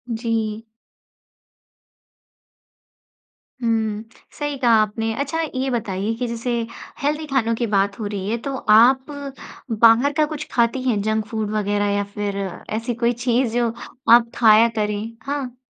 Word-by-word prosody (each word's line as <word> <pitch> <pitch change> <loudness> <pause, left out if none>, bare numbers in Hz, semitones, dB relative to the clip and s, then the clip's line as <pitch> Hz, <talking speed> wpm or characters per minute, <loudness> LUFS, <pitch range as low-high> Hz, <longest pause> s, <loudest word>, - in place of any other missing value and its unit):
जी। 225 -1 -2 3.0
हुँ, 220 -2 0 0.4
सही 290 -1 -2
कहा 245 -3 +2
आपने। 225 +1 -1
अच्छा, 290 +4 -2
ये 270 -4 -2
बताइए 210 -3 -2
कि 245 +1 -3
जैसे 235 +1 -4 0.5
हेल्दी 300 +2 -1
खानों 255 -5 +1
की 235 0 -1
बात 200 0 0
हो 215 - -3
रही 200 -1 -4
है, 230 - 0
तो 275 +3 -5
आप 250 +4 +5 0.8
बाहर 235 +5 +6
का 305 - +4
कुछ 305 0 -6
खाती 235 +1 +1
हैं, 210 -4 +1
जंक 215 +1 0
फ़ूड 220 -2 -3
वगैरह 205 -1 0
या 205 - 0
फिर 205 -1 -2 0.4
ऐसी 230 +2 -2
कोई 235 0 +1
चीज़, 240 0 0
जो 235 -1 +1 0.4
आप 235 -1 +6
खाया 225 0 +6
करें? 210 -1 -1 0.2
हाँ। 275 -3 -4
230 Hz, 140 wpm, -21 LUFS, 215-255 Hz, 3.0 s, बाहर